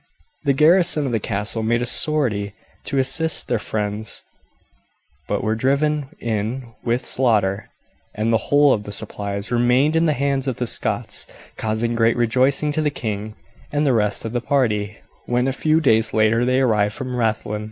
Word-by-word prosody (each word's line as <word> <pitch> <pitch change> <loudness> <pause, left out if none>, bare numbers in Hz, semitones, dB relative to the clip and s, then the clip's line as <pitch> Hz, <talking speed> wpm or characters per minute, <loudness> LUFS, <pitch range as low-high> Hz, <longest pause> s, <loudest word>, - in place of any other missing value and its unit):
The 140 - +3
garrison 155 +1 +4
of 130 - -2
the 115 - 0
castle 105 +2 -1
made 120 +2 0
a - - -1
sortie 115 -8 +2 0.3
to 140 - -2
assist 135 +5 +1
their 120 - 0
friends, 105 0 -3 1.0
but - - -2
were 110 - 0
driven 140 +4 0
in 115 +2 -3
with 120 +1 -1
slaughter, 105 -6 +1 0.5
and 110 +2 0
the 115 - 0
whole 145 -1 +5
of 105 - -1
the 105 - -7
supplies 100 -1 -4
remained 125 +5 +2
in 165 +1 +3
the 155 - +2
hands 140 -1 -1
of 130 - -1
the 125 - -3
Scots, - - -2 0.3
causing 110 +2 -1
great 115 0 +2
rejoicing 130 +5 +2
to 155 - -1
the 150 - +1
king 110 -5 -5 0.4
and 145 +1 0
the 135 - +3
rest 105 -1 0
of 115 - -5
the 120 - -1
party 110 -7 0 0.3
when 125 +1 +1
a 135 - 0
few 155 +3 +2
days 110 -7 +2
later 110 +2 +3
they 130 +1 +2
arrived 105 -4 +1
from 130 -1 -5
Rathlin. 110 -2 -1
120 Hz, 175 wpm, -21 LUFS, 110-135 Hz, 1.0 s, whole